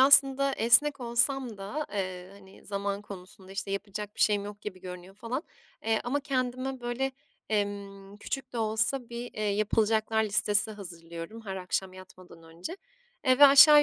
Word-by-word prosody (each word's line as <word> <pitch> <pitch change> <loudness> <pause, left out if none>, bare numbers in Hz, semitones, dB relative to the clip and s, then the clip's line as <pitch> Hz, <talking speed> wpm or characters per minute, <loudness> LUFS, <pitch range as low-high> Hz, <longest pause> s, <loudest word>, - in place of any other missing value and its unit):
aslında, 275 0 +6
esnek 275 +5 +4
olsam 240 -1 +2
da, 245 +11 -4
eee, 185 -2 -4
hani, 195 -1 -16
zaman 200 0 -3
konusunda 190 0 -11
işte 195 0 -4
yapacak 205 +1 -5
bir - - -7
şeyim 205 -1 +3
yok 205 0 -8
gibi 185 -3 -7
görünüyor 180 +1 -9
falan, 240 +7 -4 0.4
eee, 225 0 +2
ama 280 +4 0
kendime 255 -1 -2
böyle, 245 +3 -2 0.4
emm, 200 -1 -3
küçük 260 +5 -5
de 235 - -3
olsa 220 +3 0
bir, 240 +1 -6
eee, 215 - -4
yapılacaklar 215 +1 +2
listesi 210 +1 +2
hazırlıyorum 170 0 -8
her 190 -1 -4
akşam 185 0 -2
yatmadan 185 -2 -14
önce, 170 - -8 0.5
eee, 255 0 +4
ve 290 - +10
aşağı 295 +2 +9
210 Hz, 155 wpm, -29 LUFS, 195-250 Hz, 0.5 s, ve